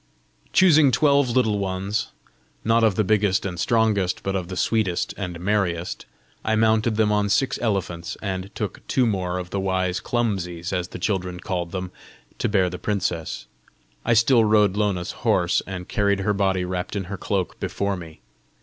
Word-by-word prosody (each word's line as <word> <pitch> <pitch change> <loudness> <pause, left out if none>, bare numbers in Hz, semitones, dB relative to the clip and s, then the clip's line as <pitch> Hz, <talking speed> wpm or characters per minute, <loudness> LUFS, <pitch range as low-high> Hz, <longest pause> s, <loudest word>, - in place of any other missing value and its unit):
Choosing 155 -6 +6
twelve 140 -1 +3
Little 115 -4 +2
Ones, 95 +2 -2 0.6
not 115 +1 +3
of 110 -4 +3
the 110 - +2
biggest 105 -2 +2
and 90 -3 -4
strongest, 110 -5 +1
but 95 0 -1
of 90 -2 -2
the 95 0 -6
sweetest 105 -6 0
and 90 -4 -5
merriest, 90 -3 -1 0.4
I 110 - +1
mounted 110 0 +2
them 110 -1 +2
on 105 -1 +1
six 130 +6 +1
elephants, 90 -7 -2
and 95 -2 -4
took 105 - -4
two 130 - +2
more 90 -5 -1
of 90 -1 -6
the 100 - -1
wise 95 -1 0
CLUMSIES, 95 -7 -2
as 90 -2 -1
the - - -8
children 90 -2 -2
called 90 -2 -3
them, 95 0 -4 0.5
to - - 0
bear 95 -3 +3
the 90 0 -5
princess. 95 -6 -2 0.6
I 120 - +2
still 115 +1 +5
rode 105 -2 +4
Lona's 100 -4 0
horse, - - +2
and 90 -2 -6
carried 100 -1 +1
her 105 +2 +1
body 95 -2 +1
wrapt 90 +2 -4
in 100 - -1
her 95 +2 -6
cloak 95 -3 -2
before 100 0 -2
me. 80 -3 -10
100 Hz, 175 wpm, -23 LUFS, 90-110 Hz, 0.6 s, Choosing